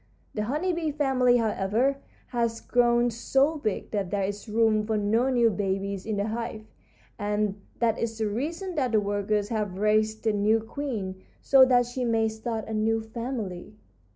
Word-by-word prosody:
The 210 -1 -2
honey 305 +10 -1
bee 330 -2 -1
family, 265 -4 +3
however, 225 +4 +1 0.3
has 235 -2 -1
grown 240 0 +2
so 270 +7 +1
big 215 -7 -3
that 200 -4 -1
there 200 0 -1
is 205 +3 -4
room 220 -1 +3
for 215 0 -1
no 220 +5 +2
new 240 -3 +3
babies 195 0 -2
in 215 - -1
the 200 +2 -1
hive, 220 -1 -4 0.5
and 205 -1 -1 0.2
that 230 -2 +1
is 225 -1 -2
the 220 -1 0
reason 325 - -3
that 260 -7 -1
the 215 - +5
workers 205 0 -1
have 210 -5 -2
raised 215 +2 +1
a 220 - +3
new 210 +2 +3
queen, 220 -6 -5 0.2
so 270 -1 +7
that 245 -1 +4
she 245 +1 -4
may 225 -2 +2
start 220 0 -4
a 220 - -5
new 220 +1 +1
family. 220 -5 -5
220 Hz, 175 wpm, -27 LUFS, 210-245 Hz, 0.5 s, so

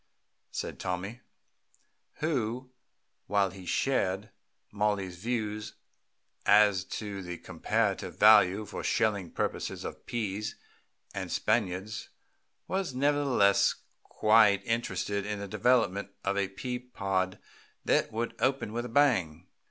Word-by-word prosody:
said - - -5
Tommy, 95 +7 -4 1.0
who, 130 -4 -1 0.6
while 100 -2 +2
he 95 -1 -11
shared 100 -6 0 0.4
Mollie's 100 -3 -1
views 110 0 -3 0.7
as 100 -3 +5
to 100 0 -5
the 90 -1 -6
comparative - - -1
value 105 -1 +6
for - - -6
shelling 100 -5 +1
purposes - - -3
of - - -8
peas 105 -2 -3 0.6
and - - -4
Spaniards, 105 -1 -1 0.6
was 190 -8 -2
nevertheless 135 -7 +3 0.3
quite 110 -2 +4
interested 100 -3 -1
in 105 0 -3
the 100 0 -5
development 105 -2 +2
of 100 0 0
a 100 -1 +1
pea 125 +5 -4
pod 95 -6 -2 0.5
that - - +2
would 115 +2 -2
open 130 -5 0
with 120 +1 -2
a - - -6
bang. 95 - +2
105 Hz, 115 wpm, -29 LUFS, 95-120 Hz, 1.0 s, value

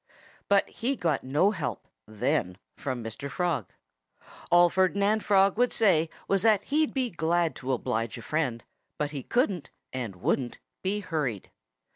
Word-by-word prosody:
But 200 -1 +4
he 255 +4 -2
got 165 - 0
no 150 +10 +3
help 140 - -4 0.2
then 95 -4 -1 0.2
from 130 -4 -4
Mr. 115 +5 -6
Frog. 165 - -1 0.8
All 175 0 +7
Ferdinand 200 +4 +2
Frog 195 +1 +4
would 245 0 +3
say 170 -8 +3 0.2
was 195 -1 +2
that 215 -3 +4
he'd 305 +2 +1
be 255 -3 -1
glad 165 +1 +1
to 135 0 -3
oblige 115 -2 -1
a 115 - -9
friend, 130 -4 -1 0.3
but 150 -1 -1
he 140 -3 -4
couldn't 195 - 0 0.2
and 120 -7 -4
wouldn't 120 +7 -1 0.2
be 200 +2 -1
hurried. 150 - -3
165 Hz, 150 wpm, -28 LUFS, 130-200 Hz, 0.8 s, All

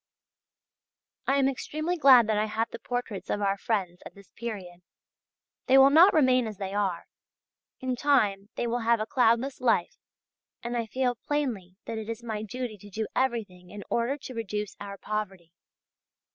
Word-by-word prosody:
I 275 - +3
am 270 -1 +3
extremely 310 +5 -2
glad 265 -7 +7
that 215 -1 0
I 215 - +1
have 220 +2 -2
the - - -7
portraits 245 -5 -4
of - - 0
our 200 -1 +1
friends 195 -4 -2
at - - -11
this 200 -1 -17
period. 195 -7 -7 0.9
They 265 - +6
will 270 +1 +8
not 340 +7 +8
remain 255 -5 +4
as 215 -2 -7
they 195 0 -5
are; 195 -4 -1 0.8
in 260 -1 -1
time 215 -8 +2
they - - -2
will 240 +1 -1
have 230 0 +2
a 215 - -1
cloudless 245 +3 +2
life, 245 -3 +1 0.7
and 240 +1 -3
I 230 -2 -1
feel 255 +2 0
plainly 235 -12 -2
that 225 - -4
it 220 0 -7
is 230 +1 -5
my 220 -3 -4
duty 220 0 -5
to 205 - -13
do 215 +3 -3
everything 215 -9 -2
in 205 +1 -8
order 235 +4 0
to 265 - -9
reduce 210 -3 -4
our 200 -1 -7
poverty. 195 -5 -5
225 Hz, 175 wpm, -27 LUFS, 205-255 Hz, 0.9 s, will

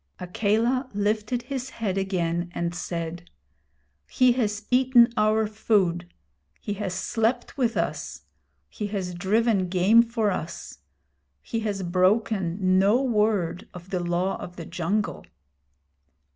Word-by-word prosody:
Akela 225 +8 0
lifted 215 +4 -1
his 265 -2 -5
head 215 -7 -3
again, 175 -3 -1
and 170 0 -2
said: 175 0 -5 0.8
'He 255 -1 +4
has 215 -4 -1
eaten 250 -2 +5
our 215 0 +2
food. 195 -5 0 0.5
He 205 - -4
has 195 -3 -4
slept 225 +5 -1
with 245 -4 0
us. - - -3 0.4
He 210 - -5
has 190 -3 -4
driven 195 +1 +1
game 190 +6 +5
for 230 -3 0
us. 170 - -6 0.6
He 230 - -3
has 205 -3 -3
broken 185 0 +1
no 205 +5 +4
word 210 -9 0
of 180 +1 -11
the 185 - 0
Law 175 +2 0
of 175 - -8
the 170 - -7
Jungle.' 185 +6 -2
205 Hz, 125 wpm, -25 LUFS, 180-225 Hz, 0.8 s, eaten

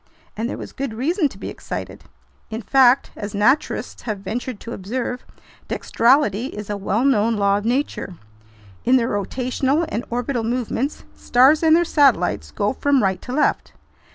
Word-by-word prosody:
And 225 +3 -2
there - - -4
was - - -8
good 270 -5 -4
reason 305 - +1
to - - -14
be - - -6
excited! - - -7 0.4
In 225 +1 -5
fact, 265 -1 +4
as 205 -1 -6
naturalists 215 +9 +1
have 215 -3 -3
ventured 235 +3 -4
to 235 - -7
observe, 245 +5 -4 0.5
"dextrality" 245 -2 +2
is 210 -4 -7
a - - -1
well 205 +5 -1
known 230 -4 +3
law 200 -1 +2
of 205 - -9
nature. 240 -6 -1 0.7
In 255 - +4
their 235 -3 +2
rotational 255 - -1
and 240 - -3
orbital 245 0 -2
movements, 245 +4 -2
stars 265 +5 +4
and 320 -1 +5
their 345 +1 +3
satellites 230 - +2
go 205 - -1
from 280 -1 +2
right 190 -1 0
to 250 - -8
left. 290 +4 0
245 Hz, 165 wpm, -21 LUFS, 210-270 Hz, 0.7 s, and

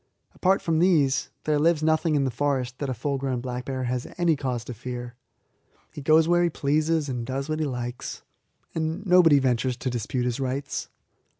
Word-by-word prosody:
Apart 190 +1 +2
from 160 -1 +1
these, 155 -7 +3
there 150 -1 +1
lives 160 0 +3
nothing 160 0 +2
in 140 - +2
the 130 - 0
forest 130 -1 -1
that 140 - -2
a - - 0
full 135 +4 -2
grown 130 -2 -1
black 125 0 -5
bear 130 -1 -3
has 125 0 -2
any 170 -2 +3
cause 130 -4 -3
to 125 - -6
fear. 120 +1 -6 0.8
He 150 - -7
goes 155 +3 +4
where 175 0 +4
he 175 - +3
pleases 155 +1 +1
and 125 -3 -3
does 135 +3 -3
what 155 0 -2
he 155 - +1
likes, 125 -2 -5 0.5
and 160 +4 -2
nobody 180 -5 +6
ventures 125 -2 +1
to 130 - -3
dispute 125 +2 -2
his 125 +1 -1
rights. 135 +1 -3
140 Hz, 195 wpm, -25 LUFS, 125-155 Hz, 0.8 s, nobody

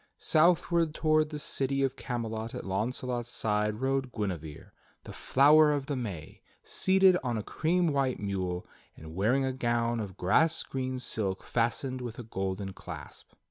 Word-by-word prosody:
Southward 165 0 +2
toward 155 -1 +2
the 150 - -5
city 135 -1 0
of 135 0 0
Camelot 115 -3 -4
at - - -6
Launcelot's 120 +4 -2
side 105 0 0
rode 135 -1 0
Guinevere, 85 -9 -5 0.3
the - - -9
Flower 150 +3 +5
of 145 -2 -1
the 145 - -2
May, 100 - -6 0.2
seated 190 -1 +4
on 120 -3 -1
a 105 - -3
cream 175 - 0
white 135 -3 0
mule, 95 -3 -3 0.3
and 80 0 -10
wearing 115 +9 +2
a 130 - -1
gown 120 -2 0
of 100 -4 -6
grass 160 - +3
green 130 -1 -3
silk 100 -6 -2
fastened 125 +2 -1
with 120 -2 -6
a 120 - -6
golden 95 -2 -4
clasp. - - -10
125 Hz, 155 wpm, -29 LUFS, 105-140 Hz, 0.3 s, Flower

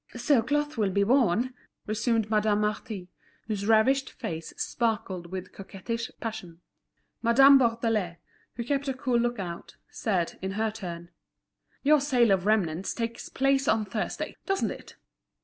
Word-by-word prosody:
"So 245 +1 +3
cloth 295 +2 -1
will 205 -2 +2
be 200 +1 +2
worn?" 245 +1 +2 0.3
resumed 225 0 0
Madame 210 -1 +2
Marty, 210 -3 -3 0.3
whose 205 -2 -3
ravished 260 +5 +4
face 160 -1 -6
sparkled 215 -7 -2
with 185 +1 -6
coquettish 215 +4 -5
passion. 215 -7 -6 0.6
Madame 270 +4 +7
Bourdelais, 225 -7 0 0.4
who 235 - -3
kept 280 +2 -1
a 265 - -1
cool 255 -2 +1
look 240 0 0
out, 175 -4 -6 0.2
said, 185 -6 -1
in 190 +1 -3
her 220 +1 0
turn: 175 -5 -7 0.7
"Your 295 0 +5
sale 250 -6 +3
of 190 0 +2
remnants 190 -5 +1
takes 230 0 -4
place 270 0 +1
on 220 -1 +2
Thursday, 210 +2 -4
doesn't 390 -1 0
it? - - -10
220 Hz, 145 wpm, -27 LUFS, 195-245 Hz, 0.7 s, Madame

